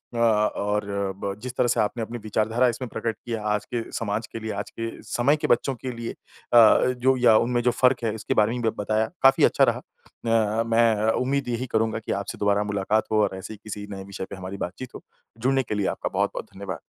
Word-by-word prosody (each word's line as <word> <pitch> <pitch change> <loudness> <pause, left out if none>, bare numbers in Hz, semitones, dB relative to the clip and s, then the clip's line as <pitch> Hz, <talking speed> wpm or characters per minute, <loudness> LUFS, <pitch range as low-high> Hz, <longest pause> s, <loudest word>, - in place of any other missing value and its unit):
अ, - - -3
और 105 -2 +1 0.4
ब 100 - -1
जिस 125 0 -5
तरह - - +3
से 120 - +1
आपने 115 +2 0
अपनी 115 +2 -5
विचारधारा 110 +3 +1
इसमें 125 +2 -2
प्रकट 115 -1 -3
किया 115 -2 -3
आज 105 0 0
के 120 - 0
समाज 110 0 -2
के 115 - -4
लिए, 110 0 -4
आज 100 0 -4
के 115 0 -2
समय 130 +5 +2
के - - -2
बच्चों 130 +3 +2
के 130 +1 -5
लिए, 115 -1 -5
अ, - - -18 0.4
जो 130 +2 +3
या 120 -3 +5
उनमें 120 +1 +1
जो 125 - +3
फ़र्क 125 -1 +4
है 110 -2 0
इसके 110 - -2
बारे 110 +3 +2
में - - -4 0.2
बताया। 110 +2 0 0.2
काफ़ी 135 0 +6
अच्छा - - +3
रहा। - - +2
अ, 115 -1 -2
मैं 115 -1 +3
उम्मीद 135 +1 0
यही 120 +1 -2
करूँगा 110 0 +1
कि - - -3
आपसे 100 - -7
दोबारा 100 0 +2
मुलाकात 105 +1 0
हो 110 0 +3
और 95 - -1
ऐसे 95 +3 -7
ही - - -11
किसी 105 -1 -6
नए 95 -1 -6
विषय 95 -1 -6
पे - - -6
हमारी 95 +1 -7
बातचीत 120 +8 -10
हो। - - -9 0.3
जुड़ने 135 +3 +1
के 110 - -4
लिए 100 -2 0
आपका - - -3
बहुत-बहुत - - -1
धन्यवाद। 95 -1 -6
110 Hz, 225 wpm, -25 LUFS, 105-120 Hz, 0.4 s, काफ़ी